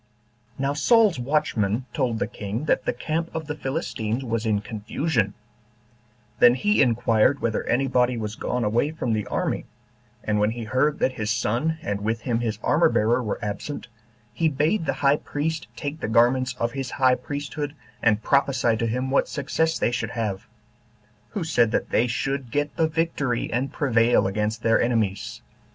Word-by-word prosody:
3. 135 - -3
Now 140 +1 +1
Saul's 205 - +4
watchmen 125 -5 0
told 125 -5 0
the - - 0
king 105 +7 -5
that 135 - +1
the - - +2
camp 160 +7 -3
of 160 -1 -3
the 150 - -3
Philistines 135 -5 -3
was 115 -1 -1
in 105 -2 +2
confusion; 110 +2 -2 1.0
then 120 0 +7
he 210 +8 +2
inquired 120 +1 +3
whether 115 -2 -1
any 135 +3 +2
body 125 -1 +2
was 105 -2 -4
gone 125 +2 -2
away 115 +7 +1
from 150 -7 -2
the 105 -1 -2
army; - - -2 0.6
and 105 -1 0
when 105 0 +3
he 115 +1 -5
heard 130 +6 +1
that - - +1
his 110 -4 -4
son, 120 +8 0
and 100 0 -2
with 110 +2 -1
him 115 0 -1
his 110 -3 -2
armor 160 +2 +4
bearer, 115 +1 +2
were 110 -4 -2
absent, 120 +5 -5 0.4
he 165 -1 +1
bade 155 +6 0
the - - +2
high 140 +1 +5
priest 155 +2 -3
take 145 +1 -5
the - - -3
garments 125 +3 +3
of 115 0 -1
his 135 -1 -4
high 130 -2 +5
priesthood, 145 +2 -4 0.3
and 110 -1 +2
prophesy 135 -4 +2
to 115 +1 -1
him 125 +4 -2
what 140 - +3
success 160 +3 0
they - - +1
should 120 - -2
have; 105 -4 -3 0.8
who 205 -5 -3
said 120 -8 +3
that - - -1
they 120 - +3
should 135 +1 -2
get 145 +4 -1
the 160 - +2
victory, 155 -7 -1
and 130 +3 -1
prevail 120 -4 +3
against 105 +3 -1
their 115 0 +4
enemies. 110 -5 -1
125 Hz, 180 wpm, -24 LUFS, 110-145 Hz, 1.0 s, then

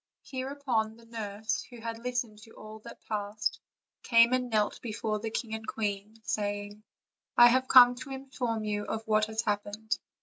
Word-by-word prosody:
Hereupon 260 -5 -2
the 230 - -17
nurse, 215 -2 -3
who 240 -2 -11
had 230 0 -5
listened 240 -3 -3
to 225 +1 -15
all 215 0 -10
that - - -13
passed, 210 0 -2 0.4
came 235 +1 +5
and 250 -1 +1
knelt 215 -2 0
before 215 -2 -2
the 225 +1 -3
king 220 0 -4
and 220 0 -5
queen, 210 0 -3
say 205 -1 -1
ing: 205 +1 -12 0.5
"I 240 - +10
have 260 +2 +2
come 245 -2 +9
to 250 +3 -9
inform 260 -4 -3
you 205 -1 -2
of 220 0 -4
what 215 0 +3
has 220 +1 -2
happened. 205 +1 -2
220 Hz, 175 wpm, -30 LUFS, 210-240 Hz, 0.5 s, I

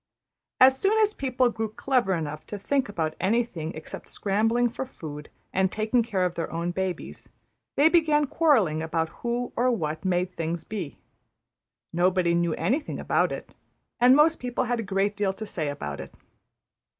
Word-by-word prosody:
As 265 +1 +7
soon 410 +3 +3
as 425 -1 +3
people 255 - +1
grew 225 -1 -3
clever 225 -3 +1
enough 155 -2 -4
to 205 - -5
think 265 +5 0
about 160 -5 -2
anything 200 -7 0
except 155 - -8
scrambling 225 +4 +1
for 240 +3 -4
food 150 - -9 0.2
and 190 0 +2
taking 220 +3 +1
care 200 -5 0
of 180 - -1
their 165 - -4
own 170 +1 -2
babies, 185 0 -4 0.5
they 290 - +6
began 315 -3 +4
quarrelling 235 - +2
about 160 0 -1
Who 240 +1 -2
or 250 +2 +2
What 160 -9 -2
made 180 -1 0
things 165 0 -3
be. 190 -9 -6 1.0
Nobody 175 0 +2
knew 170 -1 +1
anything 255 - -1
about - - +1
it; - - -7 0.5
and 250 +2 +7
most 315 +3 +4
people 245 0 -2
had 245 -1 -1
a - - -2
great 200 +1 0
deal 200 -2 0
to 215 +3 -6
say 160 -7 -3
about 75 - -5
it. - - -8
205 Hz, 170 wpm, -26 LUFS, 170-250 Hz, 1.0 s, As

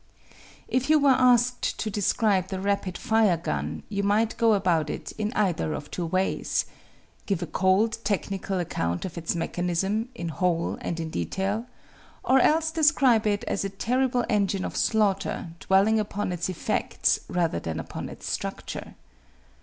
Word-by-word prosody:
" - - -22 0.3
If 260 +2 0
you 310 - +6
were 285 -2 +5
asked 250 -1 +3
to 215 - -3
describe 200 -1 +1
the 190 0 -4
rapid 195 -2 -1
fire 220 -5 +3
gun 165 - -3
you 200 -1 -2
might 215 +3 +1
go 225 -2 +4
about 170 -6 +1
it - - -5
in 215 0 -3
either 180 -6 0
of 145 - -7
two 175 -2 -3
ways: 185 +3 0 0.6
give 190 -4 0
a - - -2
cold 190 +7 +2
technical 195 -1 -2
account 85 - -2
of 180 - -6
its 170 0 -2
mechanism, 180 +6 -1
in 170 -6 -4
whole 170 +2 -1
and 170 - -3
in 160 -1 -4
detail, 195 - -2 0.6
or 265 +1 +4
else 315 +4 +3
describe 275 -9 +4
it 205 -1 0
as - - -2
a 195 - -2
terrible 245 +5 0
engine 200 -3 +1
of - - -5
slaughter, 200 -5 +1
dwelling 200 +3 +3
upon 205 -2 -2
its 175 0 -2
effects 185 - 0
rather 170 - 0
than 80 -1 -4
upon 80 - -6
its - - -9
structure. - - -5
200 Hz, 160 wpm, -26 LUFS, 175-225 Hz, 0.6 s, you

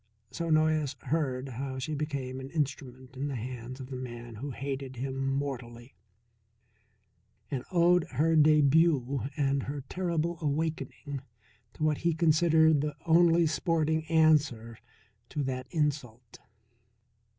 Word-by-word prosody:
So 170 0 -3
Noyes 155 -3 +2
heard 140 -4 -1
how 130 +2 -5
she 130 +4 -3
became 140 -4 -3
an 130 0 -7
instrument 130 -4 -4
in 135 +2 -3
the 140 - -3
hands 125 +2 -6
of 130 0 -9
the - - -4
man 120 -2 -7
who 140 +6 -5
hated 135 0 -5
him 135 +2 -3
mortally, 125 -3 -4 1.6
and 130 -3 -2
owed 175 -1 +4
her 160 +5 +2
debut 150 -3 +4
and 140 -1 +1
her 140 +2 -5
terrible 170 +2 -2
awakening 150 -2 -3 0.5
to - - -6
what 155 -1 +2
he 170 -1 +1
considered 160 -2 +4
the 150 -1 -3
only 170 0 +5
sporting 160 -1 0
answer 150 -8 +2 0.5
to 145 - -2
that 130 -1 -3
insult. 135 -7 -3
140 Hz, 130 wpm, -29 LUFS, 130-160 Hz, 1.6 s, only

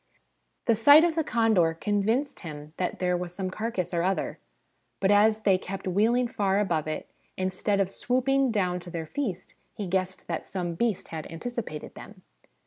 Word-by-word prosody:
The 230 - +4
sight 285 +8 +8
of 340 -1 +3
the 320 0 0
condors 220 - +2
convinced 220 +7 0
him 150 -2 -8
that 180 - -2
there 180 -1 +1
was 175 0 -4
some 185 -1 -3
carcass 215 -4 -3
or 170 - +1
other; 190 +2 -1 0.6
but 195 +1 +3
as 215 +1 +4
they 195 -3 +3
kept 195 +1 -6
wheeling 225 +7 +2
far 200 -3 +1
above 165 -7 0
it, 155 - -4 0.3
instead 190 +2 0
of 195 - +3
swooping 260 +6 +1
down 185 -5 0
to 180 - -10
their 165 -1 -4
feast, 190 - -4 0.2
he 205 - -4
guessed 185 0 -2
that 165 - -4
some 180 -3 -3
beast 215 +2 -1
had 160 -2 -6
anticipated 205 -3 -5
them. - - -12
195 Hz, 175 wpm, -27 LUFS, 180-225 Hz, 0.6 s, sight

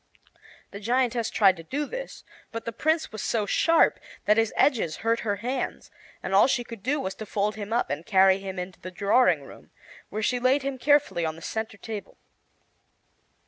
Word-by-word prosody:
The 200 - -8
giantess 235 +1 0
tried 195 -4 +4
to 165 - -9
do 285 - -3
this, - - -7 0.3
but 230 0 -6
the 230 - -3
Prince 315 +6 0
was 215 - -6
so 220 -3 0
sharp 330 +10 +3 0.3
that 210 - +4
his 225 -1 +2
edges 220 - +2
hurt 230 +1 +2
her 205 -3 -1
hands, 250 +5 -4 0.3
and 190 - -3
all 195 - +6
she 245 -2 0
could 230 -3 -10
do 275 +8 0
was 190 -7 -3
to 215 - -8
fold 210 +1 0
him 210 0 -7
up 240 +1 0
and - - -3
carry 190 -3 +4
him 195 -1 -6
into 180 0 -6
the 185 - -7
drawing 200 - +3
room, - - -14 0.4
where 215 +2 -4
she 245 +3 +1
laid 260 +3 +2
him 270 -1 -3
carefully 285 - +3
on 160 -1 -2
the 165 - -13
center 220 -2 -4
table. 215 -1 -7
220 Hz, 195 wpm, -26 LUFS, 195-255 Hz, 0.4 s, all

